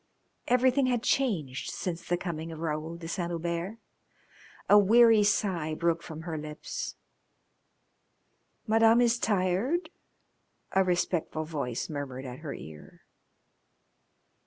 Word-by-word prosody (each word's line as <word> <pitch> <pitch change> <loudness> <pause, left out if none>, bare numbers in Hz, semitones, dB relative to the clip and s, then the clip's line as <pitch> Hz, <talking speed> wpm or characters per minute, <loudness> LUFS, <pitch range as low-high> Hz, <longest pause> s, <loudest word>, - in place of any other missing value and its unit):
Everything 255 +2 +3
had 245 -2 0
changed 170 - 0
since 170 -2 -4
the 175 - 0
coming 165 -2 -5
of 160 - -7
Raoul 160 +1 -3
de 165 -1 -8
Saint 170 0 -2
Hubert. 170 +4 -3 0.9
A 205 - +8
weary 225 +2 +6
sigh 185 -6 0
broke 170 +1 0
from 160 -1 -8
her 160 -2 -4
lips. 150 0 -6 1.7
"Madam 225 +1 +5
is 240 0 +3
tired?" 205 - 0 0.8
a 190 - +4
respectful 175 -3 -1
voice 140 -7 -3
murmured 140 -3 -5
at 125 0 -7
her 155 -3 -6
ear. 75 -1 -12
170 Hz, 115 wpm, -29 LUFS, 155-220 Hz, 1.7 s, A